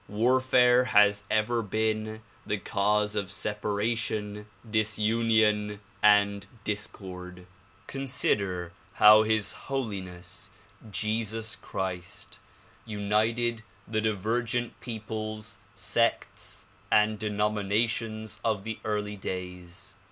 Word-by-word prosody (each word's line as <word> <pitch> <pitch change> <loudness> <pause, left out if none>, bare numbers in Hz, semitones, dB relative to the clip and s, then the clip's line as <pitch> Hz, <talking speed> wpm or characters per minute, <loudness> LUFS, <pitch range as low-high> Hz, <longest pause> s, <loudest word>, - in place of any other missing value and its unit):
War 115 +6 +3
fare 125 -1 +5
has 105 -3 +4
ever 110 +2 +2
been 110 +1 -1 0.2
the 105 - -1
cause 105 +2 +1
of 100 -2 -1
separation, 105 0 -2 0.2
disunion 110 -1 +2 0.2
and 100 -1 +4 0.2
discord. 90 -3 -5 0.4
Consider 100 -10 -1 0.2
how 105 0 +8
His 110 -1 +1 0.2
Holiness 95 -9 -4 0.4
Jesus 110 +2 -1
Christ 95 -2 -5 0.4
united 110 +3 0 0.3
the 110 0 0
divergent 115 +3 -1
peoples, 110 -2 -5 0.2
sects 100 0 -1 0.3
and 105 0 +4
denominations 105 +1 -1
of 110 -3 0
the 110 0 -5
early 105 -1 -2
days. 90 0 -6
105 Hz, 85 wpm, -28 LUFS, 100-110 Hz, 0.4 s, how